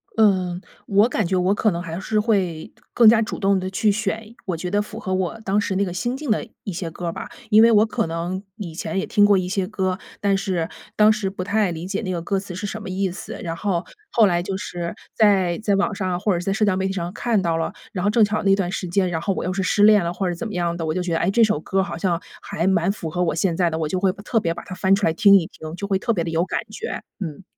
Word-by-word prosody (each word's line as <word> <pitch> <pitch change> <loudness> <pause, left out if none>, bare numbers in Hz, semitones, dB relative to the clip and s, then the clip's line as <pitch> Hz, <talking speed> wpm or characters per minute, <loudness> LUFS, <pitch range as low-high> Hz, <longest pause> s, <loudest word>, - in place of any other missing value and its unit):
嗯， 185 -5 +2 0.3
我 205 +3 +4
感 215 -7 0
觉 185 - 0
我 185 +2 +2
可 215 +1 +2
能 170 -2 -2
还 165 0 -5
是 215 +2 0
会， 190 -8 0 0.2
更 235 -2 +6
加 225 0 +7
主 215 - -3
动 195 -1 +2
地 185 0 -3
去 210 +2 +2
选， 220 +2 -3
我 180 -3 -2
觉 180 +2 -4
得 205 0 +2
符 210 - -8
合 190 -2 -3
我 190 +4 -1
当 205 0 +1
时 190 - -2
那 200 +1 +2
个 180 - -5
心 240 +8 -2
境 290 -6 -3
的 230 - 0 0.2
一 195 - -4
些 170 -1 -4
歌 175 +2 -6
儿 165 - -2
吧。 - - -7 0.2
因 215 +1 +8
为 230 0 +7
我 215 0 +5
可 225 -3 -1
能 170 +3 -3
以 185 -7 -7
前 190 - -4
也 190 - 0
听 205 - +3
过 205 -1 +5
一 180 -1 -1
些 190 0 -1
歌， 190 -3 -2 0.2
但 200 -1 +2
是， 185 -4 -1 0.3
当 215 0 +6
时 205 -3 -2
不 185 -1 -5
太 205 0 +1
理 165 +1 -5
解 195 +3 -2
那 185 -4 -3
个 175 - -2
歌 195 +1 0
词 190 -3 -8
是 195 - -4
什 215 +2 -5
么 - - -7
意 190 0 -1
思， 185 - -8
然 165 -1 -3
后， 175 -1 -1 0.2
后 225 -3 +4
来 175 -2 +2
就 190 +1 -3
是 175 -2 -5 0.2
在 195 -5 +3
在 205 -2 +2
网 200 +1 +1
上 185 -2 -2
或 205 -1 +1
者 170 - 0
是 180 - -6
在 195 - 0
社 215 +1 +2
交 195 -2 +2
媒 190 0 0
体 190 - -2
上 175 0 -4
看 230 -3 +1
到 170 -3 0
了， 165 - -1 0.2
然 180 -2 -3
后 205 - +3
正 215 0 +5
巧 215 +1 -1
那 195 -1 +4
段 185 -2 -1
时 185 - -3
间， 185 +1 +1
然 160 -1 -2
后 195 +1 -1
我 - - -3
又 185 - -2
是 195 - -1
失 205 +2 +2
恋 210 -3 +7
了 170 - -1
或 190 0 -2
者 175 - -1
怎 225 +7 -5
么 210 - -7
样 170 -1 0
的， 165 - -4
我 155 - -1
就 180 - -1
觉 175 -2 -2
得， 165 - +1
哎， 175 - +1
这 230 +3 +4
首 215 -8 +2
歌 190 +4 0
儿 - - +1
好 190 - -5
像 170 0 0 0.2
还 165 - -3
蛮 190 0 +2
符 175 -5 -6
合 180 +1 0
我 165 - 0
现 170 0 +1
在 175 -1 +2
的， 160 - -3
我 155 -2 -1
就 185 +3 -1
会 190 -1 +2
特 210 +3 -1
别 165 -4 -1
把 - - -8
它 185 - -8
翻 190 +1 +3
出 200 - 0
来 160 - +2
听 200 +2 +6
一 175 -4 +4
听， 155 +1 -9
就 200 - -5
会 195 -1 +1
特 235 - 0
别 175 -6 0
地 165 - -3
有 165 +1 +1
感 - - -2
觉， 445 - -5 0.2
嗯。 175 0 -6
190 Hz, 325 characters per minute, -22 LUFS, 175-205 Hz, 0.3 s, 因